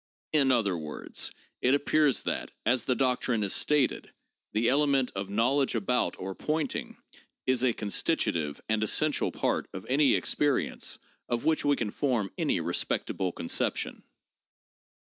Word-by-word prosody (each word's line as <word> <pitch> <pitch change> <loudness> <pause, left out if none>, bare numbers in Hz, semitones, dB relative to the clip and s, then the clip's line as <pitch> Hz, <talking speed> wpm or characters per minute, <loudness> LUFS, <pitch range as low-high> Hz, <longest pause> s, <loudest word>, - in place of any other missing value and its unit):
In 140 -4 +4
other 110 -7 +2
words, 75 -2 -6 0.3
it 130 +3 +4
appears 145 -1 +2
that, - - -2 0.2
as 120 +3 +2
the 130 - +1
doctrine 125 -3 +1
is 100 - 0
stated, 150 -4 +1 0.4
the 110 +2 +1
element 140 -1 +3
of 95 0 -4
'knowledge 125 +6 +2
about' 120 +3 +1
or 95 +1 -5
'pointing' 155 +8 -2 0.5
is 130 -1 +2
a 130 - +4
constitutive 80 -7 0
and 110 0 +1
essential 155 +7 +1
part - - -1
of 95 - -6
any 140 +2 +4
experience 145 -2 -1 0.3
of 120 -1 -1
which 160 -1 +2
we 145 0 +3
can 110 -6 -2
form 120 -9 0
any - - 0
respectable 95 -2 -1
con 85 - -7
ception. - - -1
125 Hz, 145 wpm, -29 LUFS, 105-140 Hz, 0.5 s, In